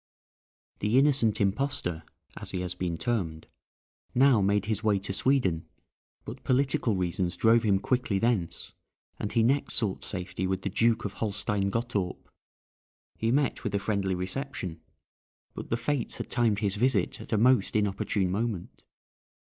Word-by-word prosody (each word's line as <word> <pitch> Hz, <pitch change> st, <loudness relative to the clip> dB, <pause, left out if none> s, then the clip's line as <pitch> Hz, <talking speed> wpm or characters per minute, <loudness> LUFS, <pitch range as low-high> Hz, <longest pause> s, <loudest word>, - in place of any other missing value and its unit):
The 105 Hz, +4 st, +2 dB
innocent 135 Hz, -6 st, +3 dB
impostor, 100 Hz, -, 0 dB, 0.3 s
as -, -, -7 dB
he 90 Hz, -, -2 dB
has 90 Hz, -1 st, -3 dB
been 90 Hz, -2 st, -3 dB
termed, 85 Hz, -10 st, -2 dB, 0.7 s
now 130 Hz, -3 st, +5 dB
made 100 Hz, +1 st, +2 dB
his 110 Hz, 0 st, -2 dB
way 105 Hz, -2 st, +3 dB
to 95 Hz, 0 st, -4 dB
Sweden, 95 Hz, -9 st, +1 dB, 0.6 s
but -, -, -8 dB
political 130 Hz, -4 st, +2 dB
reasons 90 Hz, -1 st, -1 dB
drove 115 Hz, +1 st, +5 dB
him 105 Hz, -4 st, +3 dB
quickly 120 Hz, -1 st, 0 dB
thence, 110 Hz, -6 st, -1 dB, 0.5 s
and 105 Hz, -, -3 dB
he 115 Hz, -, +3 dB
next 135 Hz, +5 st, +1 dB
sought 105 Hz, -5 st, -1 dB
safety 90 Hz, -1 st, -3 dB
with 95 Hz, 0 st, -2 dB
the 100 Hz, -, -1 dB
Duke 115 Hz, +3 st, +2 dB
of 100 Hz, -, -3 dB
Holstein 105 Hz, -2 st, -1 dB
Gottorp. 105 Hz, -4 st, -2 dB, 0.9 s
He 115 Hz, -, +1 dB
met 140 Hz, 0 st, +1 dB
with 105 Hz, -2 st, -2 dB
a -, -, +4 dB
friendly 100 Hz, -2 st, -1 dB
reception, 90 Hz, -, -4 dB, 0.7 s
but -, -, -8 dB
the 115 Hz, -, +1 dB
fates 140 Hz, -1 st, -2 dB
had -, -, -6 dB
timed 110 Hz, -3 st, +2 dB
his 100 Hz, -1 st, 0 dB
visit 130 Hz, +5 st, +1 dB
at -, -, -11 dB
a -, -, +3 dB
most 120 Hz, -2 st, +3 dB
inopportune 100 Hz, -2 st, 0 dB
moment. 105 Hz, -2 st, -3 dB
105 Hz, 155 wpm, -28 LUFS, 95-120 Hz, 0.9 s, now